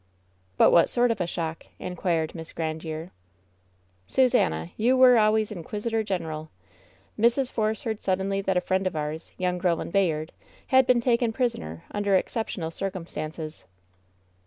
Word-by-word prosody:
"But - - +6
what 170 - +5
sort 245 -1 +2
of 225 - -2
a 175 - 0
shock 165 -2 -4
?" - - -37
inquired 170 -3 -1
Miss 160 -1 -8
Grandiere, 160 +1 -4 1.0
"Susannah, 85 - +2
you 250 +4 +3
were 250 -2 +7
always 215 0 +2
inquisitor 210 +5 -2
general. 160 -6 -4 0.7
Mrs. 240 +3 +3
Force 215 -1 -1
heard 220 -3 -3
suddenly 195 +1 0
that 190 -1 0
a - - +2
friend 190 +1 0
of 185 - -3
ours, 155 +1 -4
young 180 -1 -1
Ro 175 -2 +2
land 165 - -6
Bayard, 160 -5 +1 0.4
had 260 -1 +5
been 245 -2 +4
taken 235 -1 +2
prisoner 150 - -2
imder 205 -2 +2
exceptional 185 -6 -3
circumstances." 165 -4 -5
185 Hz, 150 wpm, -26 LUFS, 160-220 Hz, 1.0 s, were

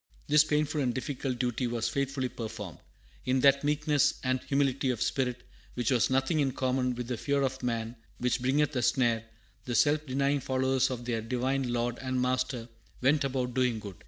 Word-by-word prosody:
This 150 0 +5
painful 150 0 0
and 125 -3 0
difficult 130 -1 -3
duty 125 0 -1
was 120 -1 -1
faithfully 135 +1 -1
performed. 105 - -7 0.5
In 130 0 +2
that 140 +1 +5
meekness 150 -1 +2
and 130 0 0
humility 135 -1 +1
of 125 -3 -1
spirit 125 -1 -1 0.3
which 120 -2 0
has 125 -3 +3
nothing 135 +4 +1
in 135 -3 +1
common 125 -1 0
with 120 -1 -5
the 125 -1 -2
"fear 140 +3 0
of 130 0 -2
man, 115 -1 -2 0.2
which 125 0 0
bringeth 145 +3 +1
a 125 - +1
snare," 120 -2 +2 0.4
the 120 - -2
self 150 +6 +3
denying 140 +2 +1
followers 130 0 +1
of 120 -2 -5
their 115 -2 -1
Divine 125 +2 -1
Lord 120 0 -1
and 130 -1 -2
Master 125 -1 -1 0.3
"went 140 +3 +3
about 130 -2 -1
doing 125 -2 +1
good." 100 -3 -8
130 Hz, 185 wpm, -29 LUFS, 120-135 Hz, 0.5 s, This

